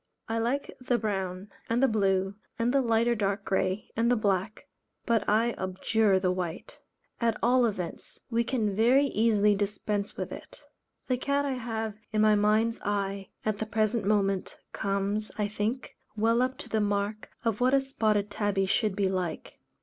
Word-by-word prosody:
I 225 Hz, 0 st, -1 dB
like 250 Hz, +5 st, -1 dB
the 250 Hz, -1 st, +1 dB
brown, 195 Hz, -3 st, -3 dB, 0.2 s
and 235 Hz, +3 st, +2 dB
the -, -, +6 dB
blue, 195 Hz, -3 st, +1 dB, 0.2 s
and 240 Hz, +1 st, +1 dB
light 235 Hz, -4 st, +3 dB
or 240 Hz, -, +4 dB
dark 200 Hz, -2 st, -1 dB
grey, 190 Hz, +1 st, -1 dB
and 230 Hz, +1 st, +2 dB
the 245 Hz, -, +4 dB
black, 205 Hz, -1 st, -1 dB, 0.4 s
but 230 Hz, -3 st, +2 dB
I 225 Hz, +3 st, +3 dB
abjure 190 Hz, +2 st, +2 dB
the 185 Hz, -1 st, +1 dB
white; 180 Hz, -2 st, -5 dB, 0.4 s
at 230 Hz, -2 st, +1 dB
all 245 Hz, 0 st, +4 dB
events 185 Hz, -6 st, -5 dB
we 235 Hz, +1 st, +2 dB
can 225 Hz, -5 st, -1 dB
very 250 Hz, +6 st, +4 dB
easily 210 Hz, -4 st, +3 dB
dispense 205 Hz, 0 st, -2 dB
with -, -, -4 dB
it. -, -, -10 dB, 0.5 s
The 255 Hz, -, 0 dB
cat 280 Hz, +2 st, 0 dB
I 280 Hz, -, -1 dB
have 225 Hz, -4 st, -3 dB, 0.2 s
in 215 Hz, -, 0 dB
my 215 Hz, 0 st, +5 dB
mind's 215 Hz, +2 st, +2 dB
eye 200 Hz, -1 st, -2 dB, 0.2 s
at 215 Hz, -1 st, 0 dB
the 220 Hz, -, -3 dB
present 215 Hz, +1 st, +1 dB
moment, 195 Hz, -2 st, 0 dB, 0.2 s
comes, 200 Hz, +2 st, -1 dB
I 210 Hz, -1 st, 0 dB
think, 215 Hz, +5 st, -3 dB, 0.2 s
well 230 Hz, +2 st, +2 dB
up 255 Hz, +1 st, 0 dB
to -, -, -8 dB
the 220 Hz, -, +1 dB
mark 205 Hz, +1 st, -1 dB, 0.2 s
of 225 Hz, 0 st, 0 dB
what 255 Hz, +2 st, +4 dB
a -, -, +5 dB
Spotted 215 Hz, -6 st, 0 dB
Tabby 200 Hz, -2 st, 0 dB
should 205 Hz, +1 st, +1 dB
be 200 Hz, -1 st, +1 dB
like. 185 Hz, -2 st, -3 dB
215 Hz, 175 wpm, -28 LUFS, 200-230 Hz, 0.5 s, the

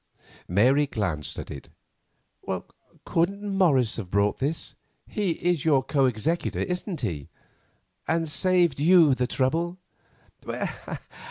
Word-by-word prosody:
Mary 130 Hz, +10 st, +4 dB
glanced 90 Hz, -, -3 dB
at -, -, -6 dB
it. 70 Hz, -, -9 dB, 1.4 s
"Couldn't 200 Hz, +5 st, 0 dB
Morris 140 Hz, -, +3 dB
have 100 Hz, -6 st, -5 dB
brought 100 Hz, +2 st, +1 dB
this?—he 165 Hz, -, -3 dB
is 175 Hz, -3 st, 0 dB
your 140 Hz, -5 st, +3 dB
co 135 Hz, -1 st, +2 dB
executor, 130 Hz, +9 st, -1 dB
isn't 180 Hz, 0 st, -3 dB
he?—and 115 Hz, -, -5 dB
saved 175 Hz, -3 st, +2 dB
you 165 Hz, -2 st, +6 dB
the 125 Hz, -1 st, 0 dB
trouble?" 165 Hz, +8 st, 0 dB
150 Hz, 100 wpm, -26 LUFS, 120-175 Hz, 1.4 s, you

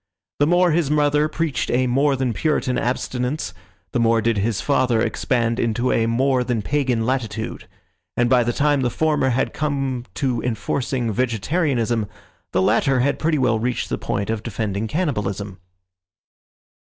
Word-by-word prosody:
The 145 Hz, -, +4 dB
more 175 Hz, +1 st, +4 dB
his 160 Hz, -2 st, +1 dB
mother 150 Hz, 0 st, +3 dB
preached 155 Hz, -5 st, -2 dB
a 130 Hz, +1 st, +2 dB
more 135 Hz, +3 st, +2 dB
than 130 Hz, -3 st, -1 dB
Puritan 130 Hz, -1 st, 0 dB
abstinence 125 Hz, +3 st, -2 dB, 0.4 s
the -, -, 0 dB
more 115 Hz, 0 st, +3 dB
did 115 Hz, -1 st, +1 dB
his 110 Hz, +1 st, 0 dB
father 130 Hz, -5 st, +2 dB
expand 115 Hz, 0 st, 0 dB
into 120 Hz, +2 st, 0 dB
a 115 Hz, 0 st, +2 dB
more 130 Hz, +2 st, +2 dB
than 120 Hz, -4 st, -1 dB
pagan 130 Hz, -5 st, 0 dB
latitude; 115 Hz, -3 st, -3 dB, 0.5 s
and 120 Hz, -, +3 dB
by 125 Hz, 0 st, +4 dB
the 120 Hz, -, 0 dB
time 145 Hz, +2 st, +2 dB
the 125 Hz, -, +1 dB
former 150 Hz, 0 st, +1 dB
had 130 Hz, +2 st, 0 dB
come 135 Hz, -5 st, -2 dB
to 125 Hz, -5 st, -1 dB
enforcing 125 Hz, 0 st, -1 dB
vegetarianism, 120 Hz, -, 0 dB, 0.4 s
the 95 Hz, -, +2 dB
latter 125 Hz, +5 st, +3 dB
had 140 Hz, +2 st, +1 dB
pretty 155 Hz, 0 st, +1 dB
well 120 Hz, -5 st, +2 dB
reached 120 Hz, +2 st, -2 dB
the -, -, -2 dB
point 100 Hz, +1 st, -2 dB
of 110 Hz, -2 st, -2 dB
defending 110 Hz, -1 st, -3 dB
cannibalism. 105 Hz, -, -2 dB
125 Hz, 155 wpm, -21 LUFS, 115-140 Hz, 0.5 s, The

